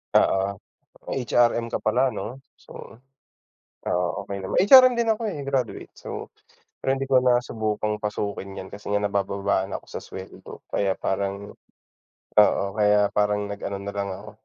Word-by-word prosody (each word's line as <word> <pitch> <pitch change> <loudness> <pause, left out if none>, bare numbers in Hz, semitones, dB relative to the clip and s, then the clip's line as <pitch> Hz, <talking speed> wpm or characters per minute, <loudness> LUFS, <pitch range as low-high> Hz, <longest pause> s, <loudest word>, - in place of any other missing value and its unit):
Oo, 95 +1 +3 0.6
HRM 120 -2 +2
ka - - -3
pala, 125 +5 +3
'no? 110 +7 -5 0.2
So, - - -12 0.9
ah, 90 0 0
okey 100 0 -6
naman, 95 -1 -4
HRM 255 +4 +9
din 235 -1 +1
ako, 220 +1 0
eh, 155 -9 -4
graduate. 135 -4 -2
So, - - -7 0.5
pero 135 - +1
hindi 135 0 -4
ko 130 - +5
nasubukang 110 -4 0
pasukin 100 -2 -4
'yan 95 - -7
kasi 100 +1 -7
nga 105 - +2
nabababaan 100 -1 -1
ako - - -6
sa - - -5
sweldo 95 0 -10
kaya 100 -1 +1
parang 100 +1 -3 0.9
oo, 105 - +4
kaya 105 -1 +3
parang 105 0 +1
nag 100 0 -6
ano 100 - -3
nalang 100 0 -4
ako 100 +3 -8
105 Hz, 150 wpm, -25 LUFS, 100-120 Hz, 0.9 s, HRM